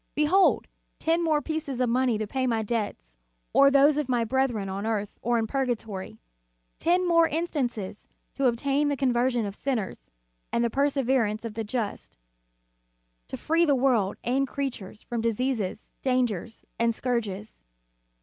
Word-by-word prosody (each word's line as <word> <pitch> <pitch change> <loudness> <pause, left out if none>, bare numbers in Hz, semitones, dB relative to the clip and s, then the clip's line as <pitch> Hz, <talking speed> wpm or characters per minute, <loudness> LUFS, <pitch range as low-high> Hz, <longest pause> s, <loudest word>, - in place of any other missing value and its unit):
Behold 325 +6 +4 0.3
ten 330 +1 +1
more 305 -3 +2
pieces 310 -5 -3
of 250 - +2
money 245 -1 +2
to 215 - -2
pay 260 +4 -1
my 225 -2 0
debts, 205 - -4 0.4
or 275 - +7
those 280 +1 +5
of 295 -3 -1
my 240 -2 +2
brethren 245 -4 0
on 195 +1 -4
earth 215 -2 -2
or 240 +1 +1
in 225 - +1
purgatory, 225 - -3 0.6
ten 355 +2 +2
more 335 -1 +5
instances 260 - -3 0.3
to 275 - +1
obtain 275 +5 +1
the 285 -1 0
conversion 245 -3 +1
of 200 - -4
sinners 210 - -3 0.4
and 235 - +1
the 235 - 0
perseverance 260 -6 +1
of 225 - -5
the 225 +1 -3
just; 220 -1 -4 1.1
to - - -6
free 330 +2 +2
the 290 -4 +4
world 245 -7 +2
and 270 +3 +1
creatures 245 -8 -5
from 235 -1 -3
diseases, 230 -3 -2
dangers 240 -5 -1
and 230 -1 +2
scourges. 220 - -3
245 Hz, 150 wpm, -27 LUFS, 220-275 Hz, 1.1 s, or